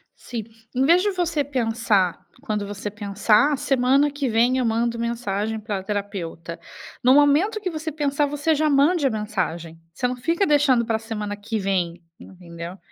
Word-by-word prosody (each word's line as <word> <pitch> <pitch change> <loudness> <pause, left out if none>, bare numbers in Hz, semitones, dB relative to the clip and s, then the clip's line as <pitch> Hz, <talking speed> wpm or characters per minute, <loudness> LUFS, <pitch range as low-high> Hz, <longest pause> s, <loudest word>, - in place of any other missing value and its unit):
Sim, 235 -3 -6 0.3
em 260 +2 +2
vez 340 +5 +5
de 410 +1 +1
você 340 -5 0
pensar 225 -8 +1 0.2
quando 215 -6 -2
você 205 +1 -5
pensar: 210 +6 +2
"Ah, - - 0
semana 275 +1 +2
que 280 -3 -2
vem, 235 +3 +3
eu 255 - +1
mando 230 +1 0
mensagem 220 -2 -2
pra 205 -3 -4
terapeuta". 190 -5 -5 0.4
No 255 +1 +6
momento 295 +10 +4
que 390 -3 -3
você 315 -1 -4
pensar, 290 -1 0
você 295 +2 0
já 310 +1 +1
mande 290 +3 +3
a - - +2
mensagem. 185 -7 -3 0.2
Você 250 - -1
não 250 - -3
fica 335 +10 0
deixando 280 -6 +3
para 225 -1 0
a - - -10
semana 210 -2 -4
que 215 +2 -4
vem, 180 -3 -1 0.2
entendeu? 170 -1 -10
235 Hz, 175 wpm, -23 LUFS, 205-290 Hz, 0.4 s, No